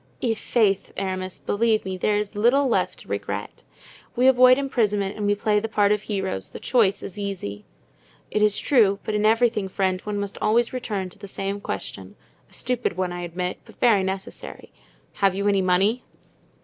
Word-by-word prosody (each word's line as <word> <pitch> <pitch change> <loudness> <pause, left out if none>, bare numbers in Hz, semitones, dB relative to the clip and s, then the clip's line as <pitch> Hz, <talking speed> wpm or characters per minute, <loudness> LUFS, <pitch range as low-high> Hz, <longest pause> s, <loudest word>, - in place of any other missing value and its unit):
I'faith, 220 -3 +1
Aramis, 185 -1 -3
believe 220 0 +1
me, 190 0 -3
there 205 +3 +1
is 210 0 -3
little 245 +7 +3
left 245 - 0
to - - -16
regret. - - -5 0.5
We 250 +1 +2
avoid 255 -1 +7
imprisonment 210 -7 0
and 210 -1 -2
we 205 - +3
play 210 0 +1
the 225 +2 -4
part 205 -1 +3
of 210 -1 +2
heroes; 190 - -3
the - - -9
choice 225 -6 +2
is 205 - -7
easy." 180 - -5 0.7
"It 210 - 0
is 210 -1 +3
true; 215 -8 +3
but 215 - -3
in 210 0 +2
everything, 225 -2 +2
friend, 185 -1 0
one 210 -1 -3
must 200 -1 -5
always 230 +3 +2
return 210 -7 -3
to 190 - -16
the 200 - -9
same 195 +1 -4
question—a - - -6 0.4
stupid 245 -8 -2
one, 185 -1 -1
I 175 - -5
admit, 180 +1 -4
but - - -17
very 225 -5 +4
necessary—have 190 0 -4
you 200 +1 -1
any 200 -1 +3
money?" 190 +6 +2
205 Hz, 175 wpm, -24 LUFS, 190-225 Hz, 0.7 s, avoid